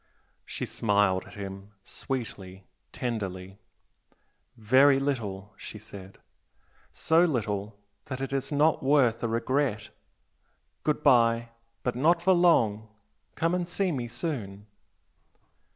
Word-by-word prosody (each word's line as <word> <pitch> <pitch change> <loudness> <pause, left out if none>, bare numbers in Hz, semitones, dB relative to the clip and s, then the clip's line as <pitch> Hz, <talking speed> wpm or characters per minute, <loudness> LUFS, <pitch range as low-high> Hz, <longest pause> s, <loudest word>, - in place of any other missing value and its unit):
She - - -4
smiled 100 -3 +1
at - - -13
him, 100 0 -8
sweetly 95 -9 -6 0.3
tenderly, 95 -5 -5 1.0
"Very 130 +5 +5
little!" 105 -8 -3
she - - -9
said 100 -2 -12 0.7
"So 160 +3 +3
little 105 - -2 0.3
that 130 - -5
it 135 0 -4
is 135 +1 -2
not 150 +2 +2
worth 130 -5 +3
a 115 - 0
regret! 115 -2 -1 0.9
Good 150 0 0
bye! 115 -3 +4 0.3
But 125 - -1
not 165 +7 +3
for 190 +2 +3
long! 115 - +3 0.5
Come 165 +1 0
and 180 -1 -1
see 185 +1 0
me 125 -6 -3
soon!" 110 - -5
115 Hz, 115 wpm, -27 LUFS, 100-145 Hz, 1.0 s, Very